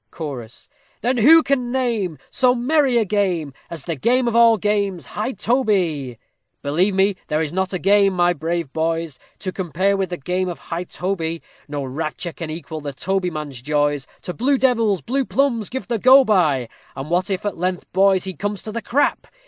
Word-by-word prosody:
CHORUS 125 Hz, -7 st, -7 dB, 0.3 s
Then 250 Hz, +2 st, +1 dB
who 315 Hz, +8 st, +7 dB
can 255 Hz, -3 st, 0 dB
name 230 Hz, -, -1 dB
So 250 Hz, -2 st, +3 dB
merry 265 Hz, 0 st, +2 dB
a 225 Hz, -, +2 dB
game, 180 Hz, -8 st, 0 dB, 0.2 s
As 165 Hz, -4 st, -5 dB
the 165 Hz, -, -3 dB
game 245 Hz, -, +2 dB
of 235 Hz, -, 0 dB
all 230 Hz, -1 st, +6 dB
games 200 Hz, -3 st, -1 dB
high 220 Hz, +5 st, -3 dB
toby? 185 Hz, -, 0 dB, 0.5 s
Believe 175 Hz, +8 st, +2 dB
me, 195 Hz, 0 st, +2 dB
there 155 Hz, +1 st, 0 dB
is 155 Hz, 0 st, -4 dB
not 190 Hz, 0 st, -1 dB
a 185 Hz, -, -1 dB
game, 195 Hz, +1 st, +4 dB
my 175 Hz, -1 st, +3 dB
brave 165 Hz, -2 st, -3 dB
boys, 165 Hz, -2 st, -2 dB, 0.2 s
To 185 Hz, -, -4 dB
compare 185 Hz, +2 st, 0 dB
with 190 Hz, -2 st, -1 dB
the 175 Hz, -, -4 dB
game 180 Hz, +5 st, -2 dB
of 175 Hz, -, -5 dB
high 165 Hz, +5 st, -5 dB
toby; 170 Hz, -3 st, -3 dB, 0.2 s
No 145 Hz, -1 st, -4 dB
rapture 155 Hz, +5 st, -4 dB
can 165 Hz, -2 st, -6 dB
equal 160 Hz, 0 st, -6 dB
the 145 Hz, -1 st, -5 dB
tobyman's 155 Hz, -6 st, -3 dB
joys, 145 Hz, 0 st, 0 dB, 0.2 s
To 180 Hz, -, -5 dB
blue 270 Hz, +7 st, +1 dB
devils, 230 Hz, -, +2 dB
blue 270 Hz, -, 0 dB
plumbs 250 Hz, -5 st, 0 dB
give 260 Hz, +1 st, -5 dB
the 235 Hz, -2 st, -1 dB
go 260 Hz, +4 st, +7 dB
by; 155 Hz, -, +2 dB, 0.3 s
And 135 Hz, +4 st, -6 dB
what 180 Hz, +2 st, +1 dB
if, 195 Hz, +1 st, -2 dB
at 205 Hz, -, -2 dB
length, 180 Hz, 0 st, -2 dB
boys, 190 Hz, 0 st, +4 dB
he 190 Hz, -, -4 dB
come 205 Hz, +3 st, -3 dB
to 215 Hz, +2 st, -7 dB
the 230 Hz, +2 st, -4 dB
crap! 265 Hz, +7 st, 0 dB
185 Hz, 190 wpm, -21 LUFS, 160-225 Hz, 0.5 s, who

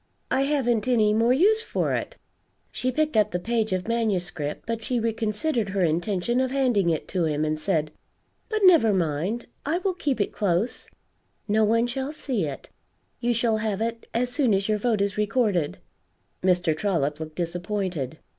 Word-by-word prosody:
I 270 Hz, -, +2 dB
haven't 255 Hz, -5 st, +1 dB
any 220 Hz, -4 st, +3 dB
more 230 Hz, +3 st, +3 dB
use 405 Hz, +12 st, +4 dB
for -, -, -1 dB
it." -, -, -3 dB, 0.5 s
She 255 Hz, -, -1 dB
picked 305 Hz, +2 st, 0 dB
up 215 Hz, -1 st, +4 dB
the 180 Hz, -, -2 dB
page 220 Hz, +3 st, -1 dB
of 185 Hz, +1 st, -1 dB
manuscript, 185 Hz, -10 st, -2 dB
but 230 Hz, 0 st, -3 dB
she 250 Hz, -2 st, 0 dB
reconsidered 225 Hz, +1 st, -1 dB
her 190 Hz, -1 st, 0 dB
intention 180 Hz, +8 st, 0 dB
of 260 Hz, 0 st, +1 dB
handing 250 Hz, -9 st, +2 dB
it 160 Hz, -2 st, -1 dB
to 180 Hz, -3 st, 0 dB
him, 155 Hz, -1 st, 0 dB
and 155 Hz, 0 st, -1 dB
said, 155 Hz, -3 st, 0 dB, 0.6 s
"But 435 Hz, -1 st, -1 dB
never 325 Hz, -, +6 dB
mind; 175 Hz, +6 st, -1 dB, 0.2 s
I 315 Hz, +4 st, 0 dB
will 375 Hz, +1 st, -1 dB
keep 290 Hz, -8 st, -2 dB
it 205 Hz, -, 0 dB
close; 200 Hz, +3 st, -1 dB, 0.6 s
no 220 Hz, +1 st, +3 dB
one 230 Hz, +2 st, +3 dB
shall 265 Hz, +4 st, -3 dB
see 255 Hz, -, -2 dB
it; 140 Hz, -, -8 dB, 0.5 s
you 240 Hz, -1 st, +1 dB
shall 230 Hz, -1 st, +2 dB
have 215 Hz, -2 st, -2 dB
it 230 Hz, +1 st, -3 dB
as 245 Hz, +2 st, 0 dB
soon 250 Hz, -5 st, +3 dB
as 195 Hz, +1 st, 0 dB
your 215 Hz, -1 st, +1 dB
vote 220 Hz, -2 st, +1 dB
is 200 Hz, +1 st, -1 dB
recorded." 210 Hz, -, +1 dB, 0.6 s
Mr. 180 Hz, -3 st, +2 dB
Trollop 155 Hz, -5 st, -1 dB
looked 155 Hz, -1 st, -7 dB
disappointed. 175 Hz, -4 st, -3 dB
215 Hz, 175 wpm, -25 LUFS, 180-245 Hz, 0.6 s, never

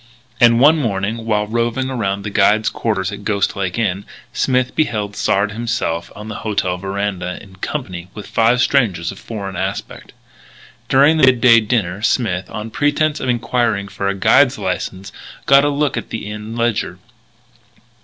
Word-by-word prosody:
And 120 Hz, -2 st, +5 dB
one 155 Hz, +5 st, +6 dB
morning, 110 Hz, -1 st, -2 dB
while 105 Hz, -1 st, +1 dB
roving 120 Hz, +4 st, -1 dB
around 100 Hz, -5 st, -2 dB
the 105 Hz, -, -5 dB
guide's 105 Hz, +2 st, +3 dB
quarters 95 Hz, -5 st, -2 dB
at 100 Hz, 0 st, -8 dB
Ghost 100 Hz, -1 st, 0 dB
Lake 95 Hz, -1 st, -3 dB
Inn, 100 Hz, -4 st, -1 dB, 0.3 s
Smith 130 Hz, -1 st, 0 dB
beheld 105 Hz, -9 st, -1 dB
Sard 100 Hz, +1 st, +1 dB
himself 105 Hz, -7 st, -3 dB
on 105 Hz, +1 st, -9 dB
the 105 Hz, -, -6 dB
hotel 100 Hz, -4 st, -1 dB
veranda, 95 Hz, -1 st, -3 dB
in 95 Hz, -1 st, -15 dB
company 95 Hz, -, -5 dB
with 105 Hz, -2 st, -8 dB
five 115 Hz, +2 st, +2 dB
strangers 100 Hz, -, +1 dB
of 95 Hz, -, -11 dB
foreign 100 Hz, -4 st, -6 dB
aspect. 95 Hz, +2 st, -5 dB, 0.8 s
During 140 Hz, +4 st, +5 dB
the 130 Hz, -, +5 dB
midday 125 Hz, -2 st, +6 dB
dinner 105 Hz, -4 st, -1 dB
Smith, 95 Hz, -6 st, 0 dB
on 105 Hz, +1 st, -6 dB
pretense 145 Hz, +3 st, +1 dB
of 130 Hz, -, -3 dB
enquiring 115 Hz, -4 st, 0 dB
for 100 Hz, -, -3 dB
a 100 Hz, -, 0 dB
guide's 95 Hz, -, +4 dB
license, 95 Hz, +1 st, -4 dB, 0.3 s
got 140 Hz, +1 st, +6 dB
a 145 Hz, -, +2 dB
look 145 Hz, 0 st, 0 dB
at -, -, -5 dB
the 115 Hz, -, -5 dB
Inn 105 Hz, +2 st, -7 dB
ledger. 115 Hz, -6 st, -1 dB
105 Hz, 165 wpm, -18 LUFS, 100-120 Hz, 0.8 s, one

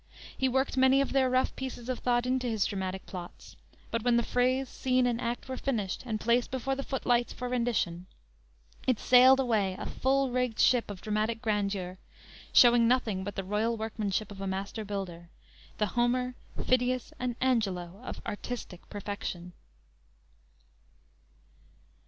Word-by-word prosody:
He 265 Hz, -, +1 dB
worked 265 Hz, +1 st, 0 dB
many 265 Hz, +1 st, +5 dB
of 275 Hz, -, 0 dB
their 265 Hz, -1 st, +3 dB
rough 255 Hz, +1 st, +1 dB
pieces 255 Hz, -2 st, -6 dB
of 255 Hz, -1 st, -2 dB
thought 240 Hz, -1 st, +1 dB
into 255 Hz, 0 st, 0 dB
his 220 Hz, -4 st, +1 dB
dramatic 190 Hz, -1 st, -3 dB
plots; 175 Hz, -2 st, -9 dB, 0.4 s
but 230 Hz, -, 0 dB
when 240 Hz, +1 st, +3 dB
the 235 Hz, -, +2 dB
phrase, 255 Hz, +3 st, +1 dB
scene 255 Hz, 0 st, +1 dB
and 240 Hz, -1 st, 0 dB
act 240 Hz, +1 st, -3 dB
were 260 Hz, 0 st, -4 dB
finished 215 Hz, -9 st, -2 dB
and 215 Hz, -2 st, -2 dB
placed 235 Hz, +2 st, +2 dB
before 265 Hz, +1 st, -2 dB
the 270 Hz, -, -3 dB
footlights 245 Hz, -3 st, 0 dB
for 250 Hz, -, -5 dB
rendition, 225 Hz, -8 st, -1 dB, 0.8 s
it 255 Hz, -4 st, +2 dB
sailed 255 Hz, +1 st, +7 dB
away, 215 Hz, -7 st, +1 dB
a -, -, -5 dB
full 270 Hz, 0 st, +1 dB
rigged 250 Hz, -2 st, 0 dB
ship 245 Hz, -4 st, +4 dB
of 200 Hz, -3 st, -7 dB
dramatic 215 Hz, +1 st, -1 dB
grandeur, 200 Hz, -4 st, -2 dB, 0.5 s
showing 240 Hz, -1 st, +7 dB
nothing 230 Hz, -6 st, +1 dB
but 205 Hz, 0 st, -5 dB
the 195 Hz, -, -3 dB
royal 215 Hz, +4 st, 0 dB
workmanship 215 Hz, -2 st, -2 dB
of 195 Hz, -1 st, -9 dB
a 195 Hz, -, -3 dB
master 195 Hz, +3 st, -3 dB
builder, 185 Hz, -4 st, -5 dB, 0.5 s
the 210 Hz, -, +2 dB
Homer, 250 Hz, +1 st, +1 dB, 0.3 s
Phidias 250 Hz, -1 st, +1 dB
and 245 Hz, -1 st, -2 dB
Angelo 200 Hz, -7 st, 0 dB
of -, -, -7 dB
artistic 205 Hz, -4 st, -6 dB
perfection. 200 Hz, -4 st, -5 dB
235 Hz, 155 wpm, -29 LUFS, 200-255 Hz, 0.8 s, sailed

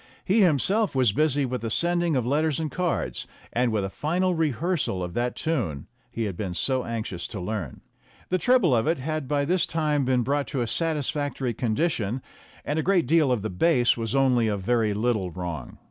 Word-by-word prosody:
He 210 Hz, +4 st, +3 dB
himself 190 Hz, +4 st, +2 dB
was 130 Hz, -5 st, +4 dB
busy 145 Hz, +3 st, +1 dB
with 125 Hz, 0 st, -3 dB
the 115 Hz, -, -3 dB
sending 170 Hz, +4 st, +1 dB
of 125 Hz, -3 st, 0 dB
letters 150 Hz, +3 st, +1 dB
and 155 Hz, -3 st, -2 dB
cards, 180 Hz, +1 st, -2 dB, 0.3 s
and 120 Hz, 0 st, +2 dB
with 105 Hz, -3 st, 0 dB
a -, -, -3 dB
final 180 Hz, -, 0 dB
rehearsal 160 Hz, -, 0 dB
of 90 Hz, -1 st, -5 dB
that 120 Hz, +3 st, -1 dB
tune 110 Hz, -, -2 dB, 0.2 s
he 115 Hz, -1 st, -3 dB
had 100 Hz, -4 st, -3 dB
been 90 Hz, -1 st, -4 dB
so 130 Hz, +5 st, 0 dB
anxious 110 Hz, -7 st, -4 dB
to 105 Hz, -, -6 dB
learn. 90 Hz, -, -4 dB, 0.5 s
The 185 Hz, -, +1 dB
treble 205 Hz, -, +4 dB
of 115 Hz, +3 st, +1 dB
it 165 Hz, +1 st, +2 dB
had 155 Hz, +1 st, -3 dB
by 145 Hz, +1 st, +1 dB
this 180 Hz, +3 st, +1 dB
time 150 Hz, -3 st, 0 dB
been 125 Hz, -1 st, +2 dB
brought 140 Hz, +3 st, 0 dB
to 135 Hz, -4 st, -2 dB
a -, -, +1 dB
satisfactory 145 Hz, -2 st, -1 dB
condition, 120 Hz, -, -1 dB, 0.4 s
and 150 Hz, +2 st, -1 dB
a -, -, +2 dB
great 180 Hz, 0 st, +2 dB
deal 155 Hz, -1 st, +3 dB
of 115 Hz, -5 st, 0 dB
the 110 Hz, -, -3 dB
bass 125 Hz, -, +3 dB
was 115 Hz, +1 st, -3 dB
only 125 Hz, -4 st, +3 dB
a 105 Hz, -1 st, 0 dB
very 110 Hz, +1 st, +1 dB
little 110 Hz, -4 st, 0 dB
wrong. 85 Hz, -6 st, -6 dB
130 Hz, 200 wpm, -25 LUFS, 110-160 Hz, 0.5 s, was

